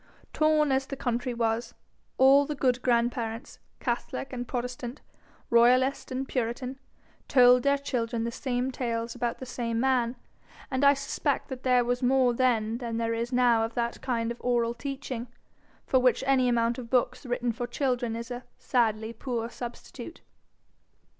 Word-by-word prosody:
Torn 310 -2 +3
as 265 0 +1
the 275 - -5
country 245 -1 -2
was, 230 0 -1 0.4
all 275 +2 +6
the 300 - -3
good 255 -3 +1
grandparents, 235 -1 -1 0.2
catholic 250 +2 -3
and 245 -1 -4
protestant, 250 +1 -4 0.5
royalist 250 +3 +4
and 260 +1 -3
puritan, 255 +2 -3 0.5
told 250 -1 +6
their 280 +2 +3
children 235 -4 -2
the 235 - -2
same 250 +1 -2
tales 230 -2 -3
about 240 -1 -2
the 260 - -7
same 235 -2 -2
man; 250 -2 +1 0.6
and 260 +1 0
I 280 0 +7
suspect 275 0 -2
there 250 -2 +3
was 245 +1 -1
more 255 -1 +3
then 230 -2 +1
than 230 -2 -3
there 230 0 0
is 235 +2 -2
now 245 -2 +4
of 225 +1 -4
that 235 0 -2
kind 235 -3 -1
of 235 - -8
oral 235 -1 +1
teaching, 255 -1 -5 0.6
for 260 - +3
which 250 -1 +3
any 260 -2 +3
amount 235 0 +1
of 235 -2 -8
books 250 +1 +1
written 245 0 0
for 240 +2 -4
children 245 -2 -1
is 235 +1 -6
a 245 0 -5
sadly 220 -2 0
poor 235 0 -4
substitute. 240 -1 -8
245 Hz, 160 wpm, -28 LUFS, 235-260 Hz, 0.6 s, I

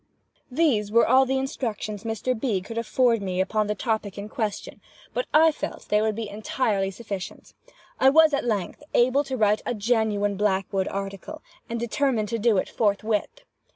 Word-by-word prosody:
These 250 -8 +1
were 230 +1 +4
all 260 +2 +5
the 265 +1 +1
instructions 225 -5 -4
Mr. 225 +3 -1
B. 220 -4 -1
could 225 +5 -5
afford 235 -1 +2
me 185 -2 -3
upon 210 +3 +1
the 210 - -1
topic 215 -2 -2
in 200 +1 -6
question, 215 -5 -4 0.3
but - - -2
I 320 +1 +6
felt 300 - -7
they 210 0 +3
would 215 -1 0
be 225 -1 -4
entirely 210 -1 -1
sufficient. 195 -2 -7 0.5
I 265 - +6
was, 315 +1 +5
at 280 - +1
length, 210 -6 -2
able 255 +4 +4
to 265 -2 -4
write 210 -1 +2
a 245 - -2
genuine 210 -2 0
Blackwood 195 -1 0
article, 195 0 -6 0.3
and 235 0 -3
determined 235 -2 0
to 230 - -2
do 220 -1 +3
it - - 0
forthwith. 215 - -1
220 Hz, 175 wpm, -25 LUFS, 205-250 Hz, 0.5 s, I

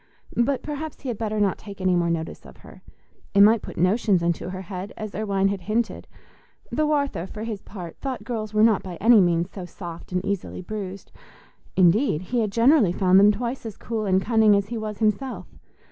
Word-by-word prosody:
But 255 +3 +1
perhaps 305 +1 -6
he 270 - -5
had 230 - -4
better 215 -1 -2
not 200 -3 +1
take 200 -2 -10
any 185 -1 +2
more 170 -1 +1
notice 165 -1 -3
of - - -14
her; - - -14 0.5
it 200 - +7
might 215 +1 +6
put - - -9
notions 185 +1 +2
into 170 +1 -1
her 185 0 -6
head, 185 +1 -6
as 215 -2 -6
Irwine 195 -1 0
had 195 -1 -3
hinted; 220 +5 -2 0.6
though 305 0 +1
Arthur, 280 - -1
for 215 +2 -7
his 220 -3 -5
part, 180 -5 -9
thought 265 -2 -4
girls 220 -4 -4
were 215 0 +3
not 220 -3 +4
by 185 -2 -7
any 225 +3 +6
means 175 0 +1
so 190 - -7
soft 175 -1 -9
and 180 +1 -1
easily 200 -2 -3
bruised; 195 -1 -7 0.6
indeed, 185 - +3
he 240 +6 -1
had 215 -3 0
generally 230 - +4
found 185 +1 +4
them 205 +1 +7
twice 235 +5 -4
as 220 -3 -7
cool 220 -2 -3
and 190 0 +2
cunning 220 -2 +4
as 200 0 0
he 240 - -4
was 215 -1 -5
himself. 220 +5 -1
205 Hz, 205 wpm, -24 LUFS, 185-230 Hz, 0.6 s, it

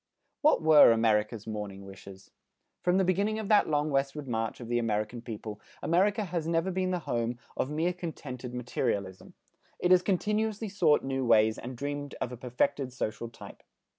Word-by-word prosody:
What 300 - +4
were 155 -5 +8
America's 110 -1 +1
"morning 105 -3 -6
wishes"? 95 0 -12 0.5
From 180 +1 +2
the 190 - +3
beginning 200 +4 +1
of 220 -2 -4
that 210 -5 +4
long 150 0 +1
westward 135 +1 -1
march 115 -2 -2
of 120 - -8
the 120 0 +1
American 110 +1 -2
people 110 -2 -7 0.2
America 200 +5 +2
has 170 -4 -3
never 165 +3 +1
been 185 0 -1
the 180 - 0
home 120 0 -1 0.2
of 130 - -1
mere 160 +4 0
contented 140 -8 -7
materialism. 115 -6 -3 0.4
It 180 - +1
has 180 -1 +7
continuously 210 +3 -1
sought 170 -7 +3
new 135 0 -2
ways 110 -2 +4
and 125 0 -7
dreamed 145 +1 -4
of 125 - -3
a - - -5
perfected 130 +2 -1
social 115 -1 -4
type. 115 - -12
135 Hz, 170 wpm, -29 LUFS, 115-180 Hz, 0.5 s, were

